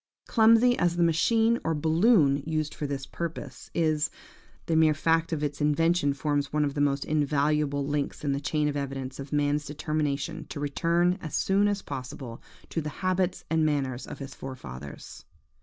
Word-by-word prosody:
Clumsy 230 +2 +5
as 175 -1 +2
the 175 - +2
machine 225 +8 +3
or 165 0 0
balloon 160 - +4
used 155 -1 -1
for 145 - -4
this 135 -1 -4
purpose 150 -6 -6
is, 155 -2 +1 0.6
the 165 - 0
mere 160 -1 +5
fact 165 +2 +1
of 155 -2 -1
its 145 0 -3
invention 150 0 +2
forms 145 -1 -1
one 150 0 +2
of 140 - -2
the 145 - -1
most 140 -1 +1
invaluable 145 -1 +1
links 145 0 -2
in 145 - 0
the 140 - 0
chain 150 +1 0
of 145 - -2
evidence 135 -2 -4
of 140 0 -7
man's 145 0 +1
determination 150 -1 -2
to - - -6
return 170 +6 +1
as 155 - -5
soon 200 +2 +3
as 205 -1 -1
possible 125 -2 -7 0.3
to 165 - -2
the 150 - -4 0.2
habits 185 0 0
and 160 -1 +1
manners 135 -4 -1
of - - -7
his 135 -1 -8
forefathers. 70 - -9
150 Hz, 175 wpm, -27 LUFS, 140-165 Hz, 0.6 s, Clumsy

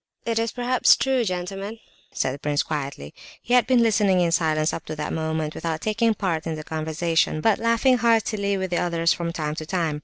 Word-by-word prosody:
"It 230 -1 0
is 230 0 -1
perhaps 245 +1 +3
true, 265 -2 +1
gentlemen," 195 +2 -4 0.3
said 130 - -1
the 140 - -8
prince, 145 0 0
quietly. 140 - -5 0.3
He 245 - -3
had 250 -1 +5
been 255 -2 +4
listening 205 -4 +3
in 170 -1 +2
silence 155 -1 +1
up - - -5
to 155 - -5
that 150 0 -4
moment 160 -1 -2
without 165 -1 -3
taking 225 +1 +1
part 170 -6 -2
in 160 - -2
the 155 - -7
conversation, 160 +1 -1
but 220 +5 +2
laughing 230 +3 +3
heartily 215 -3 +1
with 190 -1 -3
the 175 - +1
others 170 -1 +1
from 170 -1 -3
time 155 -2 -3
to 155 0 -6
time. 165 -5 -1
175 Hz, 210 wpm, -24 LUFS, 155-225 Hz, 0.3 s, had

